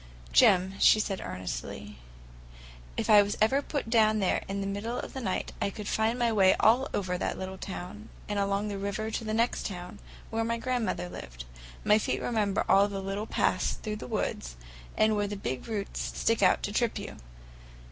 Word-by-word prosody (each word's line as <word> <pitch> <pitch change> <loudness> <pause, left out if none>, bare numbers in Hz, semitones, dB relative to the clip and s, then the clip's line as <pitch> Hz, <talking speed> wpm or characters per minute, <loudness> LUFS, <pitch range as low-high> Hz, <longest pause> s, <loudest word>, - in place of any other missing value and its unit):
"Jim," 185 - +5
she 215 - +6
said 195 -2 -2
earnestly, 65 -7 -6 1.0
"if - - -1
I 210 -1 +8
was 205 0 -1 0.3
put 285 -6 -2
down 220 -2 +4
there 195 -3 +1
in 195 +1 -3
the 195 - -2
middle 205 +5 -3
of - - -7
the 265 - -5
night, 190 -6 -2
I - - +1
could 205 +1 -7
find 220 +3 +1
my 240 -2 +2
way 195 -3 +5
all 245 +5 +4
over 180 -2 -2
that - - -2
little 190 0 -6
town; 195 +3 -7 0.2
and 205 -1 -1
along 200 +1 0
the 200 -1 -4
river 200 +2 -3
to 225 - -3
the 215 - -3
next 230 +2 +1
town, 180 +1 -8 0.3
where 225 0 0
my 230 +1 -1
grandmother 240 -7 -1
lived. - - -9 0.4
My 210 +1 +5
feet - - -1
remember 210 -4 0
all 200 +1 +5
the 200 -1 -4
little 195 +3 -4
paths - - +1
through 215 -1 -5
the 125 - -8
woods, - - -3 0.4
and 215 0 +4
where 205 0 0
the 205 - -4
big 130 -8 -4
roots 210 -3 -3
stick 230 -2 +1
out 185 - +4
to 205 - -2
trip 235 +1 +1
you. - - -7
205 Hz, 195 wpm, -29 LUFS, 190-220 Hz, 1.0 s, I